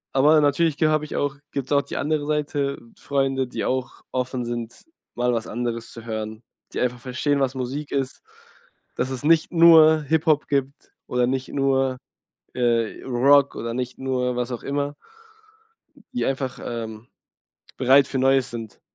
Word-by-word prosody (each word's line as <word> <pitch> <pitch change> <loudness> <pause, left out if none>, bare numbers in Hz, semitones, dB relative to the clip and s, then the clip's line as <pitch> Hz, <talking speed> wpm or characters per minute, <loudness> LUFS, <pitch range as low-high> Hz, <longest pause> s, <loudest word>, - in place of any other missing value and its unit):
Aber 150 +3 +6
natürlich 145 +1 +2
ge 155 - +3
habe 155 0 +1
ich 150 - -7
auch 145 -1 -1 0.2
gibt’s 140 0 -4
auch 140 - +4
die - - -7
andere 150 0 -1
Seite: 145 -2 -1 0.2
Freunde, 135 -2 0
die - - -4
auch 130 0 -2
offen 125 -1 -2
sind, 120 -1 -6 0.3
mal 125 0 +1
was 115 -1 -2
anderes 115 0 -4
zu 115 -1 -11
hören, 110 0 -5 0.3
die - - -4
einfach 125 0 -1
verstehen, 135 +3 -1
was 135 -1 0
Musik 130 +3 -4
ist, 135 -2 -2 0.7
dass 130 - -1
es 130 -1 -5
nicht 160 +1 +3
nur 160 -2 +7
Hip-Hop 155 0 +2
gibt 140 -1 -2 0.2
oder 125 0 +1
nicht 130 0 -2
nur, 135 -2 +1 0.6
äh, 115 -3 0
Rock 140 +3 +4
oder 115 0 -4
nicht 125 0 -4
nur 125 -2 -1
was 125 0 -2
auch 120 - -5
immer. 145 +1 -2 1.2
Die 250 - -1
einfach 130 -1 -2
ähm, 115 -1 -6 0.7
bereit 135 +2 +5
für 135 - -3
Neues 135 0 +3
sind. 115 -3 -8
135 Hz, 160 wpm, -23 LUFS, 125-145 Hz, 1.2 s, nur